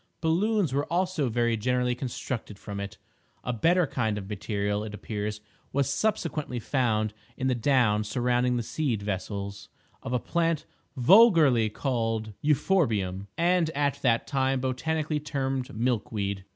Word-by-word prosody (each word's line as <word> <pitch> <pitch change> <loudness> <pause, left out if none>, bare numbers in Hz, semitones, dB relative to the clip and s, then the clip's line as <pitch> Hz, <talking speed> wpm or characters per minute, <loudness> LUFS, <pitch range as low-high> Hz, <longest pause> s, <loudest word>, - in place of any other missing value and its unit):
Balloons 180 - +1
were 145 +3 -1
also 175 -6 +1
very 120 0 +1
generally 125 +2 +1
constructed 120 -4 -5
from 100 0 -7
it. 100 0 -6 0.5
A 125 - -2
better 170 - +3
kind 110 -6 -1
of 95 -2 -6
material, 105 0 -2
it 105 -1 -6
appears, 105 0 -4 0.3
was 140 0 +1
subsequently 155 - -1
found 110 -4 0 0.2
in 130 - -2
the 130 - +3
down 120 -4 +2
surrounding 125 +2 +1
the 120 - -1
seed 120 -5 -2
vessels 100 0 -4 0.3
of 130 - -6
a 125 - +2
plant 165 +3 0 0.3
vulgarly 150 - +6
called 115 -3 -2
euphorbium, 115 - +1
and 175 -1 +3
at 140 -1 0
that 115 -4 +2
time 135 -1 +1
botanically 150 +4 -1
termed 135 -3 -2
milk 120 -2 0
weed. 100 -3 -3
125 Hz, 140 wpm, -27 LUFS, 105-145 Hz, 0.5 s, vulgarly